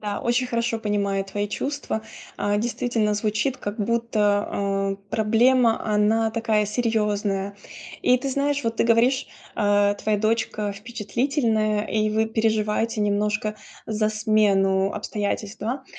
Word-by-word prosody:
Да, 205 -1 -3
очень 240 +2 +1
хорошо 235 -1 -1
понимаю 200 -2 -1
твои 205 +1 -3
чувства. 275 -4 -3 0.3
А, 205 0 0
действительно, 230 -2 0
звучит, 215 +5 0
как 205 +2 -6
будто, 210 -2 +1
э, 195 0 -1
проблема- 230 +2 +3
она 220 +2 +2
такая 220 -2 +1
серьезная. 210 -3 -1 0.5
И 250 - +5
ты 275 - -3
знаешь, 280 0 0
вот 230 0 -1
ты - - +2
говоришь, 240 +4 +3 0.3
э, 205 -1 +3
твоя 210 -1 +1
дочка 215 -1 0
впечатлительная, 220 0 -1
и 215 -1 0
вы 220 +1 +1
переживаете 220 0 0
немножко 210 +1 0 0.3
за 215 0 0
смену 200 -3 +2
обстоятельств, 210 0 -3
два? 260 +5 -3
215 Hz, 130 wpm, -24 LUFS, 205-230 Hz, 0.5 s, И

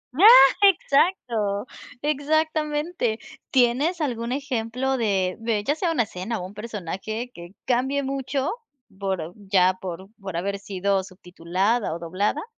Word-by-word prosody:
Ah, 390 +8 +7 0.3
exacto. 255 - +2 0.4
Exactamente. 300 -3 0 0.3
¿Tienes 265 +7 +2
algún 240 -5 -2
ejemplo 265 -1 -1
de 195 -6 0
de 225 -2 -1
ya 290 - +1
sea 335 +1 -1
una 245 -8 +2
escena, 205 +3 -5
o 180 - -5
un 190 - -10
personaje 215 +2 -5
que 175 +3 -12
cambie 265 +3 +1
mucho, 270 0 -2 0.5
por 185 -4 -3
ya 190 -3 +2
por 190 +1 -6
por 190 -3 -5
haber 200 +3 -2
sido 195 0 -1
subtitulada 185 +3 -2
o - - -7
doblada? 195 - -1
225 Hz, 130 wpm, -24 LUFS, 190-275 Hz, 0.5 s, Ah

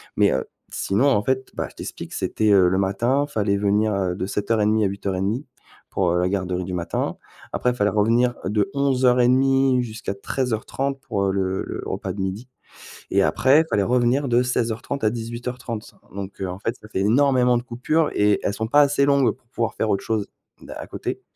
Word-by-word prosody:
mais - - +4
heu, 65 - 0 0.3
sinon, 105 +9 +1
en 105 -6 +2
fait, 130 +1 -1
bah, - - -2
je - - -24
t'explique. - - -7
C'était, 110 -1 0
heu, 95 -3 +6
le 95 - +1
matin, 115 +9 +1
il - - -19
fallait 100 -4 +1
venir, 105 +2 +2
heu, 95 -2 0
de 95 - -3
07:30 105 +1 +1
à - - +3
08:30 100 +6 -2 0.4
pour, 90 -3 +1
heu, 90 - +1
la 90 +1 +1
garderie 90 -2 -2
du 90 +1 -5
matin, 85 -1 -2 0.4
après, 125 - +1
il 125 - -5
fallait 105 -3 +2
revenir 115 +4 +2
de 105 -1 0
11:30 130 0 +3
jusqu'à 110 -3 -5
13:30 130 +5 -2
pour 100 -5 -1
le 95 -1 -1
le - - -5
repas - - -3
de 100 - -5
12:00 95 +6 -4 0.6
et - - +3
après 140 +4 +4
il - - -3
fallait 100 - +2
revenir 125 +4 +2
de 125 0 +3
16:30 120 +2 -2
à 110 - +3
18:30 120 0 -6 0.2
donc 100 0 -7
heu, 95 - -2
en 90 - -5
fait, 115 +3 -2
ça 105 - -12
fait 100 - -2
énormément 125 +3 +3
de 120 - -3
coupures 130 +6 0
et 105 -1 +3
elles 100 - 0
sont 110 - -2
pas 145 +5 +5
assez 140 -1 +3
longues 140 -2 +3
pour 130 -2 -17
pouvoir 115 -3 -2
faire 110 - -1
autre 100 - 0
chose 110 -3 -1 0.4
à - - -6
à - - -8
côté - - -5
110 Hz, 200 wpm, -23 LUFS, 100-125 Hz, 0.6 s, heu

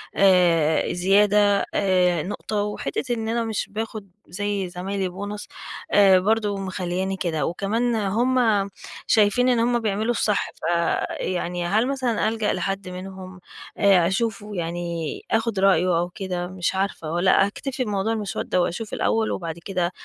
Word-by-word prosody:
آآ، 175 -6 +3
زيادة 200 +2 +3
آآ، 180 -4 +2
نقطة، 205 +2 -3
وحتة 210 +4 -3
إن 225 -2 -3
أنا 235 +1 0
مش 220 -2 -3
باخد 215 -2 -5 0.2
زي 200 0 -2
زمايلي 190 +1 -3
bonus 205 +3 -6 0.4
آآ، 195 -2 +6
برضو 210 +1 +1
مخلياني 190 0 -3
كده. 160 -6 -1
وكمان 225 +7 -1
هم 220 0 +1 0.4
شايفين 220 +4 +4
إن 240 -2 +3
هم 240 +1 +2
بيعملوا 220 +1 0
الصح، 210 -3 0
فيعني 175 +1 -1
هل 215 +7 +2
مثلًا 255 -5 0
ألجأ 220 -1 -1
لحد 195 -1 -3
منهم 185 0 -8 0.4
آآ، 190 -4 +5
أشوفه، 210 +1 -2
يعني 170 -2 -3
آخد 225 -3 +1
رأيه 180 -3 +3
أو 175 +1 -1
كده؟ 180 -1 -4
مش 185 0 -2
عارفة، 190 -5 -2
والّا 190 +3 +3
أكتفي 255 +5 -4
بموضوع 210 0 -1
المسودة 195 -4 -1
وأشوف 210 +6 -3
الأول 225 -1 +1
وبعد 170 -1 -4
كده 180 -3 -1
195 Hz, 140 wpm, -23 LUFS, 180-215 Hz, 0.4 s, آآ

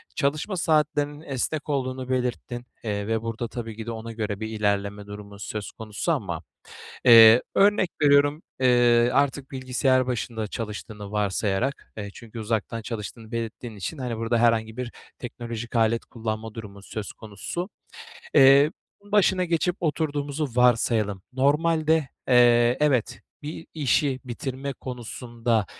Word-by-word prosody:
Çalışma 155 +6 -1
saatlerinin 150 -2 +1
esnek 150 +1 -3
olduğunu 130 -2 -2
belirttin, 125 -1 -2 0.2
eee, 100 -2 -2
ve 110 0 0
burada 115 +1 -3
tabii 115 -2 -6
ki 110 - -6
de 115 - -4
ona 115 0 -6
göre 105 -3 -3
bir 110 - -3
ilerleme 100 -1 -1
durumu 105 0 -10
söz 105 0 -5
konusu 110 +9 -3
ama, 95 - -2 0.6
eee, 115 -1 +9
örnek 200 -2 +4
veriyorum, 145 +1 +4 0.2
eee, 120 -2 +4
artık 140 -1 +1
bilgisayar 130 0 +1
başında 115 -3 -3
çalıştığını 105 -1 -6
varsayarak, 105 +4 -1
eee, 100 -1 -5
çünkü 115 -1 -10
uzaktan 110 +1 -2
çalıştığını 110 0 -7
belirttiğin 115 0 -5
için, 100 - -5
hani, 125 -4 -3
burada 115 +1 0
herhangi 115 -1 +2
bir 125 -2 -4 0.3
teknolojik 120 -1 -6
alet 115 0 +2
kullanma 110 -1 -5
durumu 100 -3 -9
söz 105 0 -6
konusu. 110 - -6 0.6
Eee, 140 +1 +7 0.3
başına 200 -3 +3
geçip 170 +1 0
oturduğumuzu 150 -2 -1
varsayalım. 115 -5 +2
Normalde, 155 +2 +2 0.2
eee, 120 -1 +5
evet, 140 -6 +1 0.2
bir 155 +2 -7
işi 140 -2 +1
bitirme 130 +3 -4
konusunda 120 -3 -2
120 Hz, 130 wpm, -25 LUFS, 110-140 Hz, 0.6 s, eee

